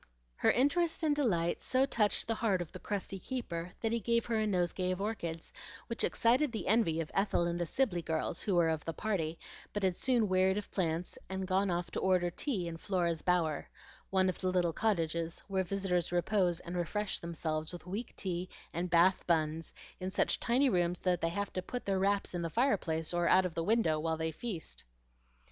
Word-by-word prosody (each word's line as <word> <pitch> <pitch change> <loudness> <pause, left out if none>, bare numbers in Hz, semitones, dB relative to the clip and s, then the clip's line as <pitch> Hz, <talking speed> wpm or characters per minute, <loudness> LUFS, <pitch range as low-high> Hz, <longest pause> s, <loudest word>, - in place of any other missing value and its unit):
Her - - +3
interest 325 +6 +2
and 300 -2 +3
delight 175 - +1
so 260 +1 +2
touched 215 -6 +1
the 225 - +1
heart 215 -4 +1
of 175 -3 -5
the - - -8
crusty 195 -1 -3
keeper 180 -7 -4
that 225 - 0
he 235 - +1
gave 235 +2 +1
her 230 -2 0
a 215 - +1
nosegay 180 -1 0
of 185 0 -1
orchids, 170 -6 -4 0.3
which 230 - -2
excited 250 +4 +3
the 225 - -4
envy 195 -7 +3
of 160 - -6
Ethel 195 -3 +2
and 170 0 -1
the 170 - -1
Sibley 205 -5 +1
girls, 160 +1 -2
who 195 - 0
were 170 -2 +4
of 160 -2 -1
the 165 - -3
party, 170 -7 -1 0.4
but 205 - -2
had 185 -2 +2
soon 245 -4 +2
wearied 190 +1 +3
of 210 - -5
plants 170 -2 -2
and 190 0 -3
gone 190 +1 +1
off 175 0 -2
to - - -2
order 180 -2 +2
tea 195 - -2
in 165 -1 -5
Flora's 170 -3 0
Bower, 170 -4 +1 0.4
one 190 -1 +3
of 185 - -2
the 185 - +1
little 175 -2 +1
cottages 170 -6 0
where 190 -1 0
visitors 180 -2 -1
repose 175 -1 +1
and 175 - -6
refresh 195 +4 -1
themselves 160 -2 -3
with 175 -2 -9
weak 205 +6 -5
tea 180 -1 -3 0.2
and 175 +2 -2
Bath 175 +2 +4
buns 160 -1 0 0.3
in 185 - -3
such 190 - +2
tiny 250 +4 +3
rooms 175 -5 +1
that 180 -2 +1
they 165 - +1
have 200 +4 -3
to 185 - -1
put 245 +6 -5
their 195 -1 +1
wraps 200 0 +1
in 175 - -2
the 165 - -2
fireplace 175 - +1
or 175 0 +2
out 185 0 +6
of 180 - -3
the 165 - -1
window 195 -7 +2
while 160 +1 -1
they 160 0 -1
feast. 180 0 -5
185 Hz, 210 wpm, -33 LUFS, 170-210 Hz, 0.4 s, out